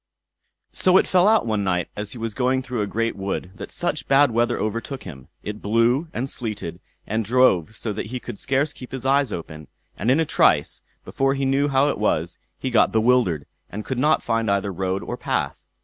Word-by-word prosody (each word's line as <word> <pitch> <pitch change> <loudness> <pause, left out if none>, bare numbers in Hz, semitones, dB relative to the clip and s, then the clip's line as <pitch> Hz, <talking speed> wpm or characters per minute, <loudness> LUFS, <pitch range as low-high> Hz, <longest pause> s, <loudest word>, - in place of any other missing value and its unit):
So 185 0 +4
it - - +4
fell 185 +1 +4
out 220 0 +4
one 110 -3 0
night 90 -2 0
as 105 0 -4
he - - -8
was 115 -1 -4
going 130 +2 +1
through 125 -3 -3
a 105 - -1
great 115 +2 -1
wood 95 -2 -4
that - - -8
such 155 -5 -2
bad 140 -1 +5
weather 115 +1 +1
overtook 115 +5 -3
him. 65 -3 -10 0.2
It 105 0 -6
blew, 115 +8 +2
and 130 +3 -3
sleeted, 105 -10 -5 0.3
and 110 +2 -1
drove 110 -5 +3
so 110 - -3
that - - -4
he 125 +3 -4
could 105 - -8
scarce 140 +2 0
keep 125 - -11
his 130 -1 -5
eyes 140 0 +3
open; 75 -3 -7 0.3
and 115 - 0
in 135 +5 +4
a 165 - +2
trice, - - +2 0.2
before 135 0 0
he 135 0 -1
knew 135 +2 +2
how 135 0 +3
it - - -2
was, - - 0 0.2
he 130 - -3
got 120 - +4
bewildered, 110 - +2 0.2
and 105 +2 -6
could 130 -2 -3
not 150 +4 +3
find 115 -2 0
either 100 0 0
road 95 +2 -2
or - - -5
path. - - -1
115 Hz, 210 wpm, -23 LUFS, 105-135 Hz, 0.3 s, bad